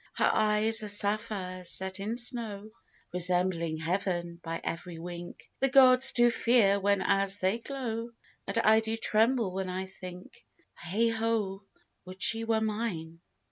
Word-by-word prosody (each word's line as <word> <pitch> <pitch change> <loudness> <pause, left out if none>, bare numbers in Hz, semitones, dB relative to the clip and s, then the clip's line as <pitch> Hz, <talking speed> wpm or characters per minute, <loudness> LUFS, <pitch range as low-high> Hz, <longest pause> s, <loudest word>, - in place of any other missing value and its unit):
Her - - +2
eyes 215 +1 +2
are 215 - -5
sapphires 200 -3 -1
set 190 0 -2
in 215 +4 -4
snow, 225 -4 -3 0.4
Resembling 180 -2 +1
heaven 175 0 -3
by 165 0 -4
every 165 +1 -5
wink; 175 +1 -9
The 270 - +2
Gods 260 0 +7
do 240 0 +3
fear 230 -4 +3
whenas 195 0 +1
they 190 +4 0
glow, 235 -3 -5 0.4
And - - -3
I 220 -1 +4
do 225 0 -3
tremble 225 -1 +1
when 190 0 -3
I 185 +1 -4
think 185 -1 -12 0.3
Heigh 210 +7 -1
ho, 220 -3 -2 0.4
would 185 0 -12
she 225 0 +3
were 225 -1 0
mine! 200 -7 -4
200 Hz, 140 wpm, -29 LUFS, 185-225 Hz, 0.4 s, Gods